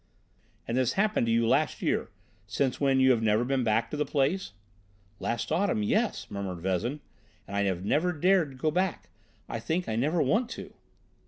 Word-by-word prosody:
"And 115 - -2
this 130 -1 +2
happened 210 - +1
to - - +2
you 115 0 +2
last 135 +6 +1
year, - - 0 0.4
since 125 +7 -1
when 135 -1 +3
you 130 0 +6
have 120 -3 +2
never 110 +1 +2
been 135 0 0
back 115 0 +1
to 150 - -3
the 150 - +2
place?" 150 - 0 0.7
"Last 120 +4 -2
autumn, 170 - +1
yes," 105 - 0
murmured 95 -3 -4
Vezin; 95 - -2 0.5
"and 100 - -6
I 100 - +2
have 95 -1 -2
never 160 - +2
dared 180 0 +2
to 135 - -13
go 155 +4 0
back. 185 +1 -1 0.4
I - - -4
think 175 +3 -2
I 110 - -1
never 150 +9 +1
want 220 - +2
to." - - -9
130 Hz, 190 wpm, -28 LUFS, 110-160 Hz, 0.7 s, you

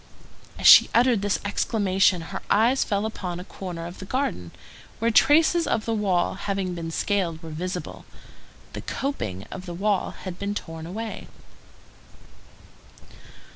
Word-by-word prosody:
As - - -6
she - - +10
uttered 235 -3 +4
this 205 -1 0
exclamation, 195 -3 +1
her 190 - -4
eyes 235 +6 +3
fell 205 0 -1
upon 180 -5 -5
a - - -7
corner 180 -3 -7
of 175 +2 -9
the 190 - -7
garden, 195 - -2 0.5
where 230 +1 +1
traces 320 +7 +4
of 220 - 0
the 230 - -1
wall 195 -5 +1
having 195 -1 -3
been 165 -1 -5
scaled 170 -2 -1
were 160 - -8
visible. 180 +5 -5 0.7
The - - -5
coping 110 - -4
of 185 0 -8
the 175 - -5
wall 200 +1 0
had 185 -2 -6
been 200 +1 -3
torn 165 -4 -6
away. 220 +5 -6
195 Hz, 145 wpm, -25 LUFS, 175-220 Hz, 0.7 s, she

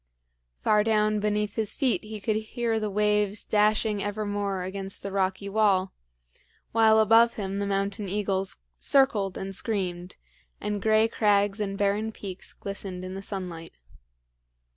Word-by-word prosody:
Far 210 -1 +4
down 215 -1 +2
beneath 210 0 -1
his 220 -1 -1
feet 265 -5 +1
he 215 0 -7
could 215 +1 -1
hear 225 +1 -2
the 215 -1 -2
waves 210 0 +1
dashing 210 0 +2
evermore 205 -2 -2
against 195 +1 -6
the 200 - -4
rocky 190 0 -1
wall, 195 -2 +2 0.8
while 220 -1 +5
above 225 +2 +5
him 195 -1 -4
the 200 - -1
mountain 200 +1 -2
eagles 195 -1 -1 0.2
circled 215 -9 +3
and 195 0 -5
screamed, 185 -4 -2 0.4
and 210 -1 -3
gray 220 +1 +4
crags 205 -2 +2
and 195 -1 -2
barren 205 +2 0
peaks 190 -4 -7
glistened 195 -2 -6
in 185 - -6
the 195 - -6
sunlight. 180 -5 -6
205 Hz, 140 wpm, -27 LUFS, 195-215 Hz, 0.8 s, while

